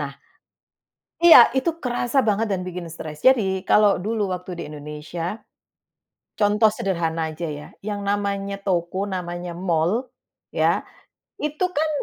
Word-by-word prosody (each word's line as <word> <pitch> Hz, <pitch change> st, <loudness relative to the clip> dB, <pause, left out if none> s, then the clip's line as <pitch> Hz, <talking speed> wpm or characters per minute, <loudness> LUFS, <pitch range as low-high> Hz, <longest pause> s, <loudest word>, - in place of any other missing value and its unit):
Nah. 140 Hz, -1 st, -5 dB, 1.1 s
Iya, 345 Hz, -, +10 dB
itu 330 Hz, +5 st, 0 dB
kerasa 245 Hz, +1 st, 0 dB
banget 215 Hz, -1 st, 0 dB
dan 185 Hz, -2 st, -1 dB
bikin 180 Hz, -1 st, -6 dB
stres. 155 Hz, -2 st, -8 dB
Jadi, 195 Hz, -8 st, +3 dB
kalo 205 Hz, 0 st, +4 dB
dulu 210 Hz, +1 st, -2 dB
waktu 180 Hz, -1 st, -8 dB
di -, -, -3 dB
Indonesia, 150 Hz, +6 st, -6 dB, 1.0 s
contoh 210 Hz, +1 st, +4 dB
sederhana 165 Hz, -5 st, -1 dB
aja 155 Hz, +2 st, -7 dB
ya, 145 Hz, 0 st, -8 dB
yang 205 Hz, 0 st, -3 dB
namanya 200 Hz, -1 st, -1 dB
toko, 185 Hz, 0 st, -1 dB
namanya 175 Hz, -2 st, -4 dB
mall, 175 Hz, +7 st, 0 dB, 0.5 s
ya. -, -, +2 dB, 0.6 s
Itu 305 Hz, +5 st, -1 dB
kan 315 Hz, -2 st, 0 dB
195 Hz, 130 wpm, -23 LUFS, 170-215 Hz, 1.1 s, Iya